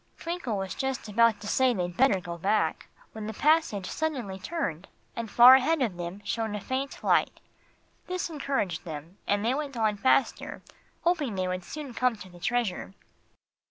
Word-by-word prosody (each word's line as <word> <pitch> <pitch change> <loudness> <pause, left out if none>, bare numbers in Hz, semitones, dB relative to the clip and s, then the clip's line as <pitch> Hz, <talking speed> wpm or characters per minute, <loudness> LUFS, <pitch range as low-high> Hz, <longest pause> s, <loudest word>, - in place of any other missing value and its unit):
Twinkle 335 - -3
was 190 -1 -3
just 265 -3 -3
about 225 0 +3
to 205 - -7
say 255 +3 +3
they'd 175 -2 -3
better 225 -4 +4
go 175 -1 -6
back, 200 +6 0 0.2
when 215 -1 -6
the 220 - -5
passage 300 - +2
suddenly 250 -9 -3
turned, 190 - -3 0.3
and 230 -1 -4
far 240 +5 +9
ahead 285 +5 +4
of 215 -7 -1
them 175 +3 -6
shone 220 -2 -2
a - - -3
faint 265 +6 -4
light. - - +2 0.7
This 365 0 -2
encouraged 275 - -2
them, 160 +2 -8
and 205 +1 +1
they 240 - +2
went 280 -2 -4
on 215 -2 +1
faster, 260 +5 +1 0.4
hoping 305 - +1
they 185 -1 -1
would 185 0 -3
soon 290 +4 -7
come 250 0 +1
to 200 -3 -11
the 175 -1 -14
treasure. 215 -3 -1
220 Hz, 175 wpm, -28 LUFS, 190-265 Hz, 0.7 s, far